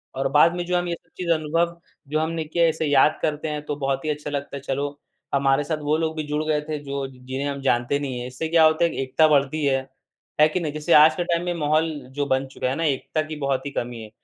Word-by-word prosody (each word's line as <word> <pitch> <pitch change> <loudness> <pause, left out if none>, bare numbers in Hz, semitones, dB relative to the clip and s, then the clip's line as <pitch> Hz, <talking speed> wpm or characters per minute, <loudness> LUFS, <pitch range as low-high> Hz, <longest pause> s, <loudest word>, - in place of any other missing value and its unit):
और 135 +1 0
बाद 160 +4 +5
में, 175 0 -3
जो 180 0 +1
हम 175 0 -1
ये 170 - -1
सब - - -25
चीज़ 180 -2 -4
अनुभव 165 +2 0 0.3
जो 155 +1 +1
हमने 160 0 -1
किया 170 +2 +1
है, 165 - +5
इसे 160 0 -2
याद 145 +1 +4
करते 155 0 -1
हैं, 150 -1 -3
तो 145 - -3
बहुत 135 0 -2
ही - - -1
अच्छा 150 0 -3
लगता 140 -1 -4
है, - - -9
"चलो, 140 +1 -3 0.3
हमारे 140 +1 +3
साथ 155 +1 -2
वो 155 - +3
लोग 160 0 -1
भी 155 - -1
जुड़ 150 +1 -1
गए 150 -1 +1
थे, 155 - -1
जो 140 -1 -3
ज - - -14
जिन्हें 130 +2 -3
हम 140 -1 -4
जानते 130 +1 +1
नहीं 130 -4 -4
हैं।" 125 - -5
इससे 130 +6 -4
क्या 160 0 +4
होता 155 +2 +3
है, 170 - 0
एक - - -5
एकता 155 +3 +5
बढ़ती 145 +1 +2
है। 135 -1 +1 0.5
है 155 - +8
कि 180 - -1
नहीं? 155 -3 -3
जैसे 155 +3 0
आज 155 +1 +7
के 175 - -1
टाइम 170 0 0
में 175 - -1
माहौल 155 0 +1 0.3
जो 145 - +1
बन 130 -1 +1
चुका 130 -1 -3
है 130 - -1
ना, 165 - -2
एकता 150 +1 0
की 155 0 -7
बहुत 135 0 -1
ही 140 - -4
कमी 120 -3 -4
है। 110 - -9
150 Hz, 280 wpm, -23 LUFS, 140-160 Hz, 0.5 s, है